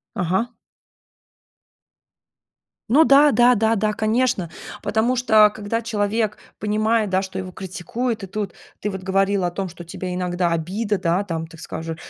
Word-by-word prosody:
Ага. 190 +6 -1 2.3
Ну 285 +7 +6
да 290 0 +6
да 245 -1 +5
да 220 +1 +2
да, 215 0 0
конечно, 215 -4 0 0.3
потому 225 +4 +1
что, 220 -4 +5
когда 215 +2 -3
человек 215 -1 -1 0.2
понимает, 215 +1 +1
да, 190 +1 +1
что 190 0 -5
его 185 -1 -6
критикуют, 200 +6 -4
и - - -5
тут 200 -1 -4 0.3
ты 210 - -2
вот 190 -1 -6
говорила 195 0 +1
о - - -3
том, 190 +1 -4
что 175 +1 -10
тебе 180 +2 -6
иногда 180 -1 0
обида, 195 +6 -1
да, 175 +3 +1
там, 165 -4 -4
так 165 0 -14
скажу, 160 0 -5
205 Hz, 155 wpm, -22 LUFS, 180-225 Hz, 2.3 s, Ну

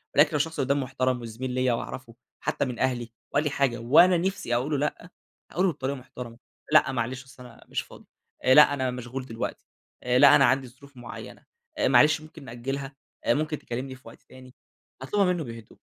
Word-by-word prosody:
ولكن 145 +1 +6
لو - - -3
الشخص 160 +2 -2
قدامي 140 +1 +1
محترم 130 -1 -1
وزميل 120 +3 -5
ليّا 130 -1 +1
وأعرفه، 115 0 -6 0.2
حتى - - -1
من 125 -3 -5
أهلي، 120 -3 -1 0.2
وقال 145 - +2
لي 150 - 0
حاجة 135 -4 0
وأنا 150 +10 +5
نفسي 180 -9 -1
أقول 130 +5 -1
له 145 - +1
لأ، 150 +5 -3 0.4
هاقول 180 - +1
له 185 - +3
بطريقة 135 0 -3
محترمة. 125 -2 -10 0.3
لأ، - - +5
معلش 125 +1 -3
أصل 130 -1 -14
أنا - - -15
مش - - -2
فاضي. - - -15 0.4
لأ، 145 +3 +7
أنا 130 -2 -1
مشغول 125 +1 -6
دلوقتي. 115 -3 -5 0.5
لأ، 140 +2 +8
أنا - - +6
عندي 130 +1 +2
ظروف 135 +2 -18
معينة. 120 - -10 0.3
آآ، - - +2
معلش 150 0 +5
ممكن 155 -2 -13
نأجلها؟ 135 +3 -5 0.3
ممكن 150 0 +1
تكلمني 130 +2 -5
في 130 - -19
وقت - - -14
تاني؟ 130 0 -15 0.5
أطلبها 200 +9 +1
منه 170 -3 -3
بهدوء. 115 -4 -10
130 Hz, 190 wpm, -26 LUFS, 125-145 Hz, 0.5 s, لأ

